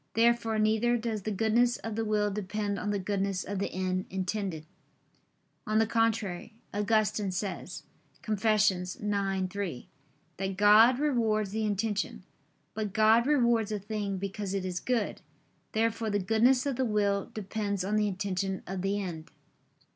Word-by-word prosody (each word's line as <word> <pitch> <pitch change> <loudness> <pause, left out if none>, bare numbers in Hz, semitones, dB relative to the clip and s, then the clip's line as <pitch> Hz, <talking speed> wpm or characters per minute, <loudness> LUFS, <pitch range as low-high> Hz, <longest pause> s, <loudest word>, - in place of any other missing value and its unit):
Therefore 230 -1 +3
neither 220 +3 +2
does 225 -2 -3
the 215 - -3
goodness 225 +4 +2
of 225 -1 -5
the 225 - -1
will 210 -1 +1
depend 205 0 -3
on 205 - -3
the 205 - 0
goodness 195 -1 -1
of 200 0 -4
the 200 - -2
end 185 0 -2
intended. 190 -3 -3 1.0
On 215 0 +1
the 225 - +4
contrary, 220 -3 -1 0.2
Augustine 210 0 +1
says 190 +1 -4 0.4
(Confess. 215 -1 +3
ix, 180 -1 -5
3) 195 -6 -2 0.5
that 195 0 -3
God 215 +5 +7
rewards 225 -8 +1
the 220 +1 -1
intention. 210 0 -1 0.5
But 210 -3 -3
God 220 +3 +4
rewards 235 -7 +3
a 210 - 0
thing 205 -1 -3
because 200 +1 -4
it 190 -1 -2
is 180 -1 -2
good. 240 -4 -1 0.5
Therefore 225 0 0
the 205 - +1
goodness 225 +7 +3
of 275 -4 -1
the 265 - +1
will 205 -2 0
depends 205 -2 -3
on 205 +2 0
the 210 0 +2
intention 190 -1 -2
of 190 0 -4
the 195 +2 0
end. 170 -5 -6
210 Hz, 155 wpm, -29 LUFS, 195-220 Hz, 1.0 s, God